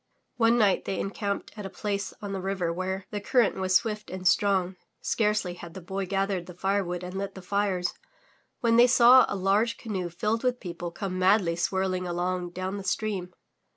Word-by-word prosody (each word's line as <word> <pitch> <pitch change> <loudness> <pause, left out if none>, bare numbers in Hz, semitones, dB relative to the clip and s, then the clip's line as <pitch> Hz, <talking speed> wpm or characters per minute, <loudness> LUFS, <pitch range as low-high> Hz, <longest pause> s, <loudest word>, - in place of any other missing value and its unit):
One 230 0 +4
night 205 -5 +3
they 195 - -2
encamped 200 0 -3
at 210 -2 -7
a - - -9
place 200 0 -3
on 200 -1 -4
the 190 - -3
river 185 -3 -1
where 185 +2 -3
the 205 - -3
current 240 0 +2
was 185 -1 0
swift 210 -1 +1
and 185 0 -2
strong. 190 -2 +2 0.2
Scarcely 210 -4 0
had 175 -1 -10
the - - -5
Boy 190 +2 -4
gathered 195 -2 -1
the 180 - -10
firewood 185 -2 -1
and 180 0 -6
lit 195 0 -4
the 190 - -8
fires, 195 -2 0 0.7
when 230 -1 +3
they 240 +1 +8
saw 250 +1 +7
a - - -2
large 200 +4 +1
canoe 190 -6 -4
filled 215 +7 -1
with 250 -1 +1
people 175 -2 -5
come 185 +1 -4
madly 185 -2 +3
swirl 190 +1 0
ing 180 0 -3
along 175 +1 -2
down 185 +3 -4
the 200 - -6
stream. 190 -2 -2
195 Hz, 195 wpm, -27 LUFS, 180-205 Hz, 0.7 s, they